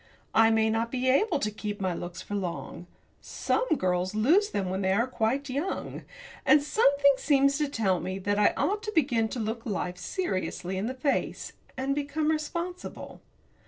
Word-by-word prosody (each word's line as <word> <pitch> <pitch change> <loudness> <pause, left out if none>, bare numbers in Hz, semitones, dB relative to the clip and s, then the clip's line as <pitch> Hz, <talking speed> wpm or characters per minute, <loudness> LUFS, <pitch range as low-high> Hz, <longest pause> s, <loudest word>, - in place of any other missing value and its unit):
I 225 0 +6
may 220 0 +3
not 225 +1 0
be 255 0 -1
able 305 - +3
to 215 -6 -1
keep 210 -1 -5
my 185 -2 0
looks 175 0 -6
for - - -8
long 180 -2 -4 0.3
some - - -1
girls 185 +2 0
lose 335 - +4
them 190 - -2
when 190 +1 -2
they 190 0 +2
are 230 +4 +2
quite 255 +3 -1
young 285 +8 -4 0.4
and 300 -1 +5
something 280 -5 +4
seems 275 -1 +3
to 295 -2 0
tell 195 -9 +1
me 185 +2 -4
that 205 +2 -1
I 210 - +4
ought 415 +2 0
to 425 -1 -4
begin 245 -8 +2
to 240 - -5
look 225 +1 -3
life 180 -4 -3
seriously 185 - -3
in 195 +4 -2
the 260 - -4
face, 275 +2 -1 0.2
and 265 +1 0
become 290 +2 -1
responsible. 340 +4 -5
235 Hz, 180 wpm, -28 LUFS, 200-285 Hz, 0.4 s, I